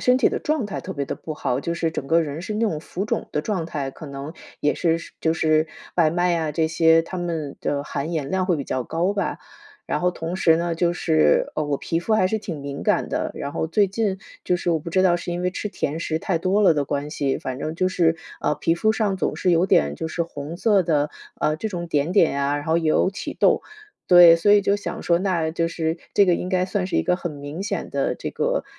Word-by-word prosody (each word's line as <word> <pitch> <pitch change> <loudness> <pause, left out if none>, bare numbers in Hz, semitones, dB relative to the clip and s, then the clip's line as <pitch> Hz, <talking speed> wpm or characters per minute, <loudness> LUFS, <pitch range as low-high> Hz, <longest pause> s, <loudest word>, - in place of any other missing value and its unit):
身 250 0 +4
体 - - +4
的 - - -3
状 300 -7 0
态 200 - -5
特 190 - -6
别 145 -4 -3
的 - - -4
不 160 - -7
好， 130 -3 -1
就 170 - -2
是 170 -1 -1
整 140 - -4
个 165 +1 +4
人 155 0 -4
是 215 - -4
那 215 - -2
种 155 -6 -3
浮 185 +4 -4
肿 215 - -2
的 150 - -1
状 185 0 -2
态， 140 -4 -4
可 155 - -11
能 140 +2 -7 0.3
也 145 - +1
是 165 -1 +1
是 - - -11
就 160 - +2
是 155 -1 +2 0.3
外 160 -3 +4
卖 175 +1 +1
呀 160 -2 0
这 160 +1 +1
些， 165 0 +4
它 185 - -7
们 165 -5 -3
的 145 0 -1
含 150 +2 -4
盐 150 -4 -2
量 190 +4 0
会 180 -2 +1
比 140 - -4
较 130 - -2
高 170 +9 -1
吧。 200 - -2 0.5
然 - - -1
后 180 0 +2
同 165 0 -5
时 165 -4 +4
呢， 170 0 -1
就 170 +1 +1
是， 160 -2 +2
呃， 155 - -1
我 145 -1 -1
皮 165 +4 -2
肤 215 +5 +1
还 185 -4 +3
是 220 +4 -1
挺 180 -8 -6
敏 140 0 -6
感 - - +1
的， - - -2
然 140 - -5
后 160 - -1
最 200 +5 +3
近 200 0 -1 0.3
就 180 - +2
是 175 - -1
我 165 - +2
不 160 - -7
知 185 +2 +3
道 180 -2 +4
是 175 0 -6
因 175 +1 -3
为 180 - +1
吃 210 - -4
甜 160 -5 -3
食 160 -1 -1
太 170 +1 -1
多 190 +4 +1
了 185 - +6
的 145 - 0
关 145 +1 -3
系， 140 -3 -1
反 130 -1 -5
正 155 +3 -4
就 185 +2 +1
是， 165 -3 +2 0.2
啊， - - +1
皮 165 +3 +1
肤 215 +5 +2
上 210 -3 0
总 - - -1
是 185 - +1
有 170 +1 +3
点 70 - +3
就 - - -4
是 170 +2 -1
红 155 -1 -7
色 200 0 +3
的， 150 -2 +1 0.3
呃， 155 - +1
这 220 - -3
种 175 -4 -4
点 150 +1 0
点 160 -7 +3
啊， 140 +1 +1
然 145 - -5
后 160 +2 +2
有 160 +2 +2
起 195 - -6
痘。 - - +4 0.5
对， 175 -2 +9
所 205 +5 +4
以 205 - +6
就 200 +1 +2
想 180 -4 -6
说， 170 -1 +2
那 175 -4 0
就 165 +1 0
是 165 -1 -2 0.2
这 200 - +5
个 180 - +4
应 180 - -3
该 185 -1 +1
算 185 -1 -1
是 - - -2
一 - - +3
个 180 - +1
很 175 -3 -5
明 145 +5 -6
显 200 -3 -3
的 140 -1 0
这 - - -5
个 - - -1
165 Hz, 285 characters per minute, -23 LUFS, 155-185 Hz, 0.5 s, 对